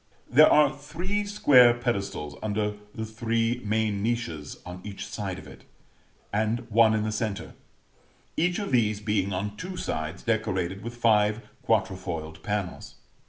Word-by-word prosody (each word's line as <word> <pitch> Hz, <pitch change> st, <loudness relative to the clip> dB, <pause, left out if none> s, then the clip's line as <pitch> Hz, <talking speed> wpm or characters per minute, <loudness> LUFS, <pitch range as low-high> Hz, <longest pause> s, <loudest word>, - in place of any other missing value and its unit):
There 150 Hz, +5 st, +7 dB
are 150 Hz, -1 st, +5 dB
three 170 Hz, +9 st, -3 dB
square 130 Hz, -12 st, +6 dB
pedestals 100 Hz, -11 st, -3 dB
under 105 Hz, 0 st, -1 dB, 0.2 s
the 110 Hz, -, -3 dB
three 115 Hz, +2 st, -1 dB
main 105 Hz, -1 st, 0 dB
niches 115 Hz, -10 st, -2 dB
on 90 Hz, +1 st, -8 dB
each 100 Hz, -1 st, -6 dB
side 100 Hz, -3 st, -4 dB
of 75 Hz, -, -10 dB
it, 70 Hz, -, -13 dB, 0.7 s
and 110 Hz, +3 st, +1 dB
one 110 Hz, 0 st, +5 dB
in 105 Hz, -, 0 dB
the 110 Hz, -, -1 dB
centre; 110 Hz, -2 st, -3 dB, 0.8 s
each 175 Hz, +2 st, +1 dB
of 205 Hz, -6 st, -3 dB
these 110 Hz, -4 st, +2 dB
being 105 Hz, -2 st, 0 dB
on 100 Hz, +2 st, -3 dB
two 185 Hz, +1 st, -6 dB
sides 80 Hz, -, -4 dB
decorated 95 Hz, -4 st, -1 dB
with 120 Hz, +2 st, -7 dB
five 110 Hz, -1 st, +3 dB, 0.2 s
quatrefoiled 85 Hz, -3 st, -1 dB
panels. 100 Hz, -3 st, -4 dB
110 Hz, 145 wpm, -27 LUFS, 100-120 Hz, 0.8 s, There